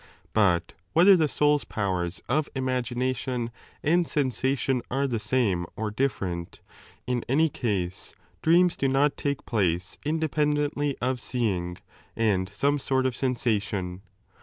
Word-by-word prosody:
But 95 -6 +2 0.2
whether 185 +4 +7
the 160 -4 +3
soul's 150 0 +3
7 115 - -14
powers 95 -3 -1
of 150 +5 +1
imagination 125 -1 -1 0.3
and 170 +2 +3
sensation 130 -2 0
are 135 +2 0
the 120 -5 -1
same 105 -6 +1
or 110 -1 -3
ditferent, 95 -8 -2 0.5
in 125 -2 -1
any 155 +5 +3
case 95 -9 -3 0.3
dreams 175 +2 +4
do 135 - 0
not 140 +2 +2
take 140 -2 -2
place 90 -4 0
indepen 150 -1 +1
dently 145 -1 -1
of 130 0 0
seeing 95 -9 -2 0.4
and 100 -5 +1
some 145 +2 +1
sort 130 -1 +1
of 130 -2 0
sensation. 105 -8 -1
125 Hz, 135 wpm, -26 LUFS, 105-140 Hz, 0.5 s, whether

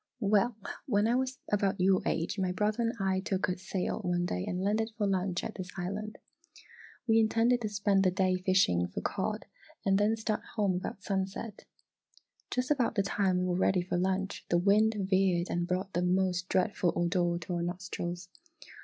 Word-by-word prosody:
"Well, 210 +2 +2 0.3
when 210 -3 +2
I 235 - +2
was 260 +1 0
about 200 -2 +1
your 185 +1 +4
age, 165 +5 -1
my 185 -1 +1
brother 210 +4 0
and 230 0 +1
I 190 -1 +1
took 190 0 -1
a 180 - -1
sail 190 +2 -2
one 175 -3 0
day 90 - -2
and 180 +1 -2
landed 215 +3 +1
for 210 - +1
lunch 185 -2 0
at - - -4
this 185 -1 -7
island. 205 +4 -4 0.9
We 225 -2 +4
intended 230 +2 +3
to 215 - -2
spend 200 -1 +2
the 185 - +4
day 185 0 +1
fishing 185 - +2
for 90 - -5
cod - - -2 0.4
and 195 0 +3
then 210 +2 +3
start 215 -1 -1
home 205 -4 +2
about 195 +2 -6
sunset. 195 +2 -3 0.8
Just 250 +2 -1
about 265 -5 +1
the 200 - +2
time 195 -2 +1
we 180 - 0
were 180 -1 0
ready 185 -1 +2
for 180 - -3
lunch, 190 +2 -1
the 175 - +3
wind 210 +5 +4
veered 190 -2 +1
and 175 0 -1
brought 185 +2 -2
the 175 - +1
most 180 0 +1
dreadful 185 -2 +1
odour 175 0 +1
to 175 +1 -5
our 170 - -1
nostrils. 175 0 -4
190 Hz, 190 wpm, -30 LUFS, 180-210 Hz, 0.9 s, your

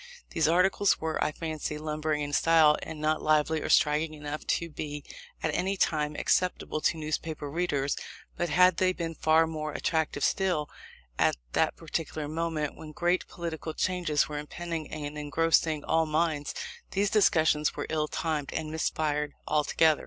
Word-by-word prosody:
These 160 -2 +2
articles, 185 +4 +3
were, 160 0 -1
I 150 - 0
fancy, 155 -1 -4
lumbering 155 0 -2
in 145 0 -4
style, 160 -1 +5
and 155 - -7
not 155 +1 +1
lively 155 +1 +2
or - - -4
striking 155 0 +3
enough 150 0 -6
to 170 - -5
be, 150 -2 -6 0.4
at - - 0
any 195 +2 0
time, 150 -4 +1
acceptable 180 -3 0
to 165 - +2
newspaper 155 -1 -3
readers; 145 -4 0 0.4
but 175 - -1
had 180 +2 +5
they 185 0 +3
been 165 -2 -4
far 160 +1 +4
more 155 -2 -4
attractive, 160 -3 -1
still, 180 -6 +1 0.5
at - - +4 0.2
that - - +2
particular 155 -2 -4
moment, 155 -1 -2
when 155 -1 -10
great 175 +3 +1
political 165 -2 -5
changes 175 -5 +1
were 150 -1 -4
impending, 165 +1 -5
and 150 -1 -5
engrossing 155 0 +2
all 160 0 +2
minds, 155 -2 0 0.3
these 200 +1 0
discussions 160 -7 +3
were - - -3
ill 155 -1 0
timed, 155 -3 -2
and 155 -1 -3
missed 160 0 -1
fire 150 -1 0 0.2
altogether. 155 +1 +3
155 Hz, 160 wpm, -29 LUFS, 150-165 Hz, 0.5 s, style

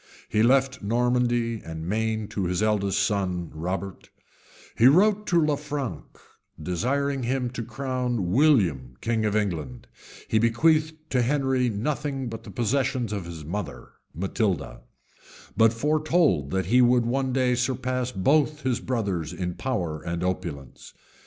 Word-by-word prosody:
He 105 - +2
left 130 +2 +3
Normandy 120 +1 +1
and 80 0 -6
Maine 110 +1 -1
to 100 - -2
his 90 +3 0
eldest 105 -2 +1
son, 90 -4 -1
Robert: 90 +4 -5 0.7
he 115 - +6
wrote 205 +8 +4
to 175 - +3
Lanfranc, 145 -3 -2 0.5
desiring 130 - -1
him 125 0 -1
to 125 - -5
crown 125 -6 -2
William 95 - +3
king 115 -1 0
of 105 -1 0
England; 80 - -2 0.4
he 110 - +2
bequeathed 155 +7 +3 0.2
to 125 -2 +2
Henry 130 -1 +1
nothing 135 +4 -2
but 115 -1 -7
the - - -9
possessions 125 -2 -1
of 100 -4 -4
his 80 -3 -8
mother, 100 +6 -5 0.2
Matilda; 95 - -2 0.7
but 110 +2 +5
foretold 150 - +1
that 95 +3 -1
he 125 +8 +4
would 120 -1 +4
one 130 +2 0
day 125 -1 +2
surpass 125 0 -1
both 150 +9 +2
his 130 -2 0
brothers 100 -10 -2
in 90 -1 -3
power 85 -11 -3
and 85 +1 -3
opulence. 85 -8 -5
115 Hz, 140 wpm, -25 LUFS, 95-130 Hz, 0.7 s, he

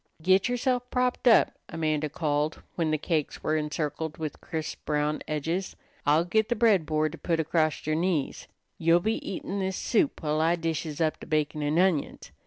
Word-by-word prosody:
"Git 185 +7 +3
yerself 245 0 0
propped 250 0 0
up," 230 - +6 0.2
Amanda 155 -2 -1
called 150 0 -1
when 165 -3 0
the 155 - +1
cakes 155 -1 -2
were 155 - +1
encircled 150 0 -2
with 155 -3 -5
crisp, 160 -2 -5
brown 150 0 0
edges. 165 +5 -2 0.3
"I'll 155 +3 +4
git 220 +4 +1
the 240 - +1
bread 210 -9 +3
board 155 -1 +1
to 165 - -10
put 165 -2 0
acrost 155 -1 0
yer 155 - 0
knees. 165 -3 -1 0.3
You 165 +1 +4
be 220 +5 -1
eatin' 195 +1 -4
this 190 -1 -2
soup 235 - 0
while 155 0 +1
I 165 +2 +3
dishes 165 -2 -3
up 155 -1 +1
the - - -10
bacon 150 -1 0
an' 150 +2 0
onions. 180 -5 +1
160 Hz, 185 wpm, -27 LUFS, 155-185 Hz, 0.3 s, up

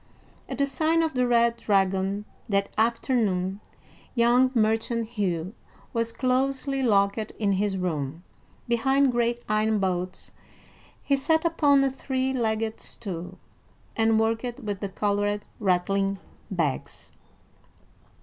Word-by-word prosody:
At - - -4
the 280 - +3
sign 315 +4 +1
of 320 - -1
the 250 -1 +1
Red 235 -1 +3
Dragon 195 0 +1 0.2
that 200 -1 +1
afternoon, 220 -5 +1 0.6
young 240 +2 +4
merchant 225 +1 +1
Hugh 190 -5 -2 0.4
was 230 0 0
closely 270 +2 0
locked 200 -3 +3
in 215 -1 -2
his 195 0 0
room. 160 -3 -3 0.4
Behind 265 +3 +3
great 240 0 0
iron 215 +1 +2
bolts 185 -2 -2 0.7
he 280 - +2
sat 320 +4 +1
upon 290 -4 +4
a 270 - +1
three 265 0 -2
legged 225 -2 -1
stool, 180 -6 -7 0.6
and 225 0 +3
worked 230 +3 -1
with 205 -4 -4
the 200 - -3
colored, 205 +1 -1
rattling 195 +1 +1 0.3
bags. 165 -8 -3
220 Hz, 120 wpm, -26 LUFS, 195-255 Hz, 0.7 s, young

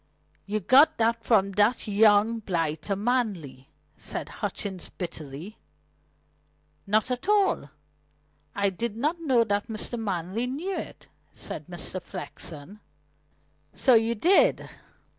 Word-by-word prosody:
"You 210 +1 -1
got 285 - +6
that 230 0 +1
from 200 -3 +3
that 210 +5 +2
young 210 +2 +4
blighter 165 -2 -2
Manley," 195 - -2 0.3
said - - -5
Hutchings 190 -4 -5
bitterly. 160 +2 -8 1.3
"Not 215 +5 +1
at 250 +10 -3
all. 410 -2 +2 0.9
I 200 -1 +1
did 225 +3 -4
not 305 +8 0
know 260 -7 +3
that 205 0 -1
Mr. 225 +1 -4
Manley 195 +2 -2
knew 330 +10 -3
it," - - -7 0.3
said - - -8
Mr. - - -4
Flexen. 170 +6 -8 1.0
"So 260 - +4
you 225 0 +3
did?" 380 - +4
215 Hz, 115 wpm, -26 LUFS, 195-245 Hz, 1.3 s, got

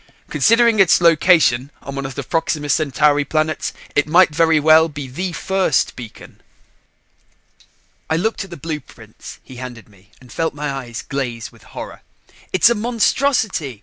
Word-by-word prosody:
Considering 230 -1 +3
its 190 -4 +5
location 165 -6 +3
on 140 - -7
one 140 0 -4
of 135 - -10
the 140 - -4
Proxima 150 0 -2
Centauri 145 -1 +2
planets, 155 +2 -2 0.2
it 150 - +2
might 175 0 +4
very 160 0 +3
well 160 +2 +5
be 145 -2 -7
the 180 +9 -4
first 190 -4 0
beacon." 115 -4 -12 1.7
I 160 - +1
looked 220 +6 -1
at 195 - -12
the 170 - -9
blueprints 150 -2 -9
he 130 - -13
handed 120 -4 -9
me 100 -1 -23
and 125 -1 -17
felt 165 -2 -2
my 150 -1 -3
eyes 125 -4 -6
glaze 120 -5 -5
with - - -20 0.2
horror. - - -8 0.5
"It's 225 +5 +4
a - - +4
monstrosity! 225 - 0
155 Hz, 155 wpm, -19 LUFS, 135-180 Hz, 1.7 s, its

